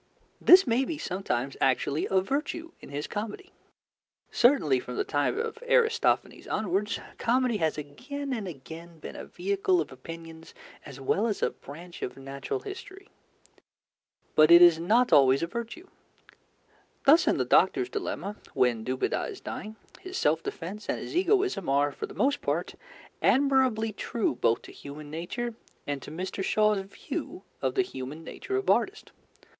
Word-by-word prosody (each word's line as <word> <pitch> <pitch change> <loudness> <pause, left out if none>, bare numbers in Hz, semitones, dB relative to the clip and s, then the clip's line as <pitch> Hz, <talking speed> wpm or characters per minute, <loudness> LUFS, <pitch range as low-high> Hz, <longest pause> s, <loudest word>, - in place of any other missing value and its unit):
This 375 +2 +8
may 245 +1 +2
be 310 +3 -3
sometimes 160 - -2
actually 135 +3 +1
a 190 -1 +3
virtue 300 - -3
in - - -12
his 145 +2 -4
comedy. 220 - -6 0.8
Certainly, 180 - +4
from 125 0 -7
the - - +1
time 145 - 0
of 455 0 -3
Aristophanes 470 -2 +2
onwards, 205 +1 -1 0.2
comedy 245 -1 +2
has 160 -5 0
again 265 - -5
and 220 -5 -3
again 165 +2 -10
been 155 - -9
a - - -7
vehicle 190 0 0
of 155 - -2
opinions 165 +4 -10 0.3
as 140 -2 -10
well 195 - +1
as 210 - -2
a - - +2
branch 170 +5 -11
of - - -4
natural 135 - -5
history. 395 0 -9 1.2
But 155 0 +6
it 170 0 +10
is 170 -2 +7
not 230 +9 +3
always 135 +1 +6
a - - +3
virtue. 235 - -6 1.2
Thus 305 +5 +6
in - - +3
The - - 0
Doctors 380 -1 +3
Dilemma, 210 - -4 0.2
when 125 -4 +2
Dubedat 130 - -1
is 400 - -8
dying, 220 -4 -7 0.2
his 375 0 -6
self 160 +2 +2
defence 200 +7 -6
and - - 0
his - - -7
egoism 375 - +2
are 140 +1 +3
for - - -6
the - - -12
most 275 +1 +1
part - - -1 0.5
admirably 260 -5 +3
true 225 - -1
both 115 -2 +1
to - - -11
human 145 +1 -10
nature 225 +9 -4 0.3
and 145 -1 -3
to - - -9
Mr. 185 +5 -4
Shaw's 210 +1 +3
view 195 - -6 0.2
of - - -1
the 385 - +3
human 145 - -7
nature 390 - -5
of 395 - -1
artists. - - +1
195 Hz, 160 wpm, -28 LUFS, -, 1.2 s, it